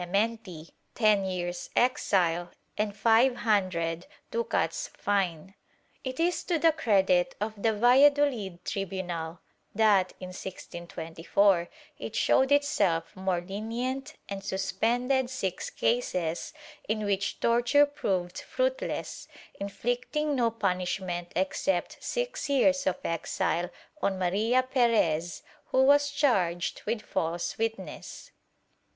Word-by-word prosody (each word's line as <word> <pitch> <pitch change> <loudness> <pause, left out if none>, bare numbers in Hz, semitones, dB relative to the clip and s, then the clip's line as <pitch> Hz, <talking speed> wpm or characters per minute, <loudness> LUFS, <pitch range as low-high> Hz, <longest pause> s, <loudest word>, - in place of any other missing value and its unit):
82 175 - -5
TORTURE 200 +4 +3
[Book 230 0 -8 0.2
VI - - -21 0.2
ten 215 -4 +3
years' 175 -1 -3
exile 180 -8 +2 0.2
and 210 -1 -1
five 235 +3 +4
hundred 180 -6 0 0.2
ducats 475 +1 -1
fine/ 190 -3 -1 0.5
It 260 +1 -5
is 345 +1 +1
to 345 - +1
the 325 +1 +5
credit 190 - +2
of 210 +1 -2
the 225 - +3
Valladolid 245 -5 +3
tribunal 180 -4 -4 0.3
that, 205 -4 +4
in 185 - -7
1624, 175 0 -1 0.3
it - - -6
showed 265 +1 +3
itself 215 - +2
more 185 -2 -1
lenient 230 +8 -4
and 195 -1 -6
suspended 240 +7 0
six 190 -8 -3
cases 180 -9 -1 0.4
in 215 -1 0
which 200 -1 -1
torture 240 +5 +4
proved 185 -11 -2
fruitless, - - -2 0.3
inflicting 245 +9 -2
no 240 -3 +2
punishment 180 -4 -2
except 185 0 -1
six - - -3
years 275 -1 +3
of 185 - +1
exile 165 +1 -1 0.3
on 195 -1 0
Maria 210 +8 +2
Perez, 220 - +1 0.2
who 260 - +3
was 285 +1 +5
charged 190 - +1
with 220 -2 -1
false 170 +1 -2
witness. 225 -4 -5
205 Hz, 115 wpm, -28 LUFS, 180-255 Hz, 0.5 s, the